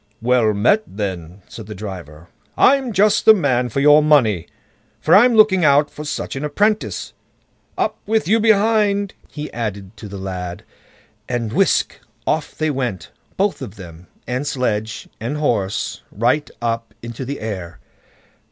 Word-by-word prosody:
"Well 120 -2 +2
met 125 - +3
then", 95 -3 -6
said 110 -3 -10
the 105 - -7
driver; 90 -5 -9 0.3
"I'm 265 -2 +4
just 210 +1 +3
the 220 - +9
man 125 -9 +1
for 140 - -1
your 150 +1 +7
money, 115 - +3 0.5
for - - +2
I'm 240 +4 +6
looking 210 -4 +5
out 145 0 +4
for 150 - -8
such 150 - -4
an 135 - -4
apprentice. 205 +9 -1 0.6
Up - - -1
with 220 -2 +1
you 220 +4 +3
behind!" 210 -2 +2 0.2
he 150 0 -7
added 100 -3 -5
to 105 - -9
the 100 0 -8
lad, 90 -2 -6 0.7
and 115 -3 -2
whisk! - - +1 0.3
off 155 -1 -1
they 155 -1 0
went, 125 -9 -4 0.3
both 200 +1 0
of 100 - -7
them, 90 -2 -12 0.2
and 125 +4 -3
sledge 110 -4 -2
and 120 +7 -3
horse, 110 -6 -1
right 125 +8 0
up 115 0 -3
into 120 +2 -6
the 140 +3 -5
air. 95 -6 -6
125 Hz, 150 wpm, -19 LUFS, 100-160 Hz, 0.7 s, the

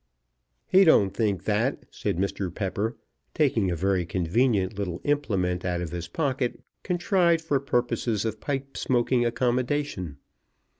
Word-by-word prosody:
"He 190 +1 +6
don't 105 - +5
think 100 -5 -1
that," 110 +5 0
said - - -2
Mr. 95 -1 -2
Pepper, 100 +5 -2 0.4
taking 120 -10 +2
a 85 - 0
very 95 +1 +1
convenient 95 +4 +1
little 95 -3 -3
implement 95 -12 0
out 90 -1 -1
of 85 -2 -4
his 85 -1 -5
pocket, 130 - -1 0.2
contrived 175 -2 +2
for 145 -4 +1
purposes 120 -4 0
of 110 -1 -3
pipe 135 -1 -3
smoking 120 -1 +2
accommodation. 120 - -1
110 Hz, 135 wpm, -26 LUFS, 95-135 Hz, 0.4 s, He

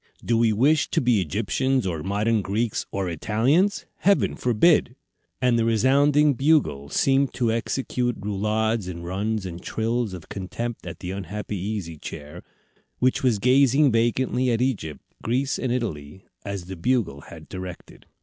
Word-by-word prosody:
Do 115 - +2
we 115 -1 +3
wish 145 +9 +3
to - - +1
be 120 -5 +2
Egyptians, 115 - 0
or 85 -4 -2
modern 105 +5 0
Greeks, 105 +4 -2
or 95 -1 -2
Italians? 120 - +1
Heaven 200 +1 +2
forbid!" 125 +2 +3 0.4
And 125 -2 +2
the - - +2
resounding 140 +6 +4
Bugle 130 - +1
seemed 135 - +2
to 120 -3 +1
execute 120 +1 -1
roulades 105 +1 -1
and 85 -1 -6
runs 100 +3 -2
and 85 -1 -7
trills 115 -2 -2
of 85 - -11
contempt 115 +5 -5
at - - -8
the 90 - -4
unhappy 100 +2 -5
Easy 95 -5 -4
Chair, 75 0 -8 0.6
which 130 0 +1
was 125 -5 +2
gazing 135 +4 +4
vacantly 125 +2 +1
at 115 -2 +1
Egypt, 105 - -2 0.2
Greece, 130 +4 -1
and 130 - -1
Italy, 95 -9 -4 0.2
as 100 -3 -5
the 95 +1 -7
Bugle 90 - 0
had - - -11
directed. 90 -1 -9
115 Hz, 150 wpm, -24 LUFS, 95-125 Hz, 0.6 s, resounding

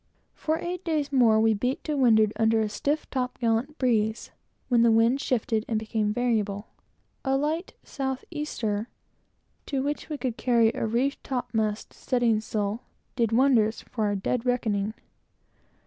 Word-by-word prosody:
For 315 +1 -1
eight 355 +2 -4
days 305 -4 -1
more 235 -5 +5
we 220 0 +4
beat 250 +6 -2
to 305 - -2
windward 220 -5 +4
under 225 0 +3
a 215 -1 0
stiff 290 +8 -1
top 255 -2 -2
gallant 240 +6 0
breeze, 220 -3 0 0.4
when 240 -2 +3
the 235 - +5
wind 230 +4 +3
shifted 225 -4 0
and 225 - 0
became 215 -1 -1
variable. 215 -3 -1 0.5
A 270 0 +1
light 315 +6 -2
south 265 -2 -4
easter, 235 -8 -3 0.8
to 270 -2 -1
which 290 +3 -3
we 300 - -3
could 255 -4 -3
carry 235 -3 +3
a - - -2
reefed 250 +5 0
topmast 220 -5 -2
studding 240 -4 +1
sail, 215 +1 -2 0.3
did 230 -3 +1
wonders 230 -3 +3
for 220 -4 -3
our 205 -1 0
dead 225 +5 -1
reckoning. 220 -4 0
235 Hz, 155 wpm, -26 LUFS, 220-270 Hz, 0.8 s, more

